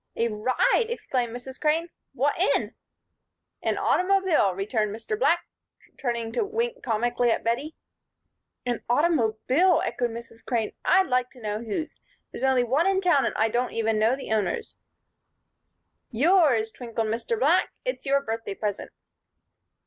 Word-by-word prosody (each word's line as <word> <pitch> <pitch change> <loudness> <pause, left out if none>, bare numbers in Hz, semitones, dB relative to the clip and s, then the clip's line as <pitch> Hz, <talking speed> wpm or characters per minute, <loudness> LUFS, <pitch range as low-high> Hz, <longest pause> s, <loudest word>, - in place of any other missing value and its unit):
"A 230 0 +1
ride!" 255 - +1
exclaimed 255 - -2
Mrs. 245 +2 -9
Crane. 320 +2 +1 0.2
"What - - +1 0.2
in?" - - -2 0.9
"An - - 0
automobile," 365 - +2
returned 210 +2 -1
Mr. 225 -1 -4
Black, 285 +10 +2 0.5
turning 235 -3 -2
to 255 - 0
wink 470 +4 -2
comically 240 - 0
at 225 - 0
Bettie. 255 +7 -1 0.9
"An 245 -2 -2
automobile!" 295 +4 +2
echoed 240 0 -1
Mrs. 230 0 -10
Crane. 230 -4 -1
"I'd 375 +1 +4
like 250 -3 0
to 255 - -15
know 210 -1 -3
whose. 235 +8 -4 0.3
There's - - -7
only 265 -2 +3
one 275 +9 +2
in 390 -1 +2
town 350 -8 +3
and - - -2
I 220 +1 +2
don't 240 +3 -1 0.3
know 225 +4 +3
the 270 - -8
owners." 220 - -1 1.4
"Yours," 270 - +3
twinkled 230 -2 -4
Mr. 235 - -2
Black. - - +3 0.2
"It's - - -3
your 280 0 +2
birthday 225 -3 -4
present." 205 -1 -3
245 Hz, 140 wpm, -26 LUFS, 225-325 Hz, 1.4 s, I'd